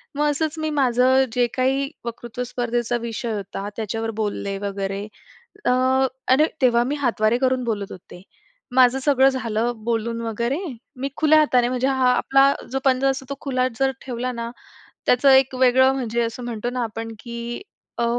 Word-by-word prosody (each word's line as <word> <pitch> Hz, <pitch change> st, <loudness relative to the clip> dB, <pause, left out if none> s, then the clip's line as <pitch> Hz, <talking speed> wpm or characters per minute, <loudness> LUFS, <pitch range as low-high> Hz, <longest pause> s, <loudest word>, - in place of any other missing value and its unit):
मग 295 Hz, +1 st, +2 dB
असंच 315 Hz, +2 st, -2 dB
मी 310 Hz, 0 st, -1 dB
माझं 260 Hz, -2 st, +3 dB
जे 245 Hz, -1 st, +3 dB
काही 270 Hz, +2 st, +1 dB, 0.2 s
वक्तृत्व 235 Hz, +1 st, -5 dB
स्पर्धेचा 240 Hz, -1 st, -1 dB
विषय 230 Hz, 0 st, -4 dB
होता 200 Hz, 0 st, -5 dB
त्याच्यावर 225 Hz, +1 st, -3 dB
बोलले 200 Hz, -1 st, -2 dB
वगैरे 195 Hz, 0 st, -3 dB, 0.6 s
अ, -, -, +3 dB, 0.6 s
आणि 285 Hz, +4 st, +5 dB, 0.2 s
तेव्हा 240 Hz, -2 st, +4 dB
मी 290 Hz, +3 st, -1 dB
हातवारे 235 Hz, -3 st, +2 dB
करून 255 Hz, -1 st, +1 dB
बोलत 205 Hz, -4 st, -3 dB
होते. 180 Hz, 0 st, -12 dB, 0.5 s
माझं 255 Hz, 0 st, +5 dB
सगळं 270 Hz, -1 st, +4 dB
झालं 235 Hz, -2 st, -1 dB
बोलून 230 Hz, 0 st, -1 dB
वगैरे 235 Hz, +5 st, -2 dB, 0.4 s
मी 275 Hz, +1 st, -2 dB
खुल्या 310 Hz, 0 st, +5 dB
हाताने 250 Hz, -5 st, +3 dB
म्हणजे 255 Hz, +1 st, 0 dB
हा 260 Hz, -2 st, +2 dB
आपला 275 Hz, +2 st, +4 dB, 0.2 s
जो 270 Hz, -, -1 dB
पंजा 265 Hz, +1 st, +3 dB
असतो 265 Hz, 0 st, -3 dB
तो 280 Hz, -, -3 dB
खुला 255 Hz, -2 st, 0 dB
जर 270 Hz, 0 st, +3 dB
ठेवला 250 Hz, 0 st, -3 dB
ना, 235 Hz, -1 st, -5 dB, 0.6 s
त्याचं 260 Hz, +3 st, +4 dB
एक 265 Hz, 0 st, +5 dB
वेगळं 260 Hz, +1 st, +4 dB
म्हणजे 235 Hz, -2 st, -1 dB
असं 230 Hz, +2 st, -4 dB
म्हणतो 240 Hz, 0 st, -3 dB
ना 250 Hz, -1 st, -2 dB
आपण 225 Hz, 0 st, -6 dB
की 235 Hz, +4 st, -6 dB, 0.4 s
अ, 235 Hz, -, +1 dB
245 Hz, 165 wpm, -22 LUFS, 230-265 Hz, 0.6 s, आणि